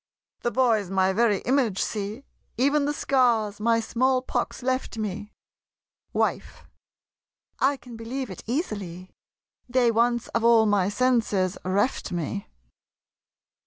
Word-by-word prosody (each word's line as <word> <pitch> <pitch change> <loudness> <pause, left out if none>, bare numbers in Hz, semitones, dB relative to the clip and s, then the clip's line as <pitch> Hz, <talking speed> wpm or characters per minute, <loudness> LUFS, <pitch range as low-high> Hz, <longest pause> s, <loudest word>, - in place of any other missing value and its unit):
The 240 - -1
boy's 230 -6 +2
my 190 0 +2
very 210 -2 +2
image! 245 -6 +1
See! 210 +5 -3 0.3
Even 280 +3 +2
the 290 - +1
scars 235 -8 +1
my 230 +1 +2
small 255 +3 +1
pox 260 - -3
left 255 -2 -1
me! 210 0 -4 0.8
WIFE. - - -2 1.0
I 275 +2 +2
can 245 -3 -12
believe 245 +1 -5
it 185 - -9
easily 200 - -4 0.6
They 245 -1 +3
once 235 +1 +1
of 230 - -1
all 230 -1 +6
my 200 -3 +2
senses 210 -5 +1
reft 200 +4 0
me. 180 +4 -3
230 Hz, 125 wpm, -25 LUFS, 205-255 Hz, 1.0 s, all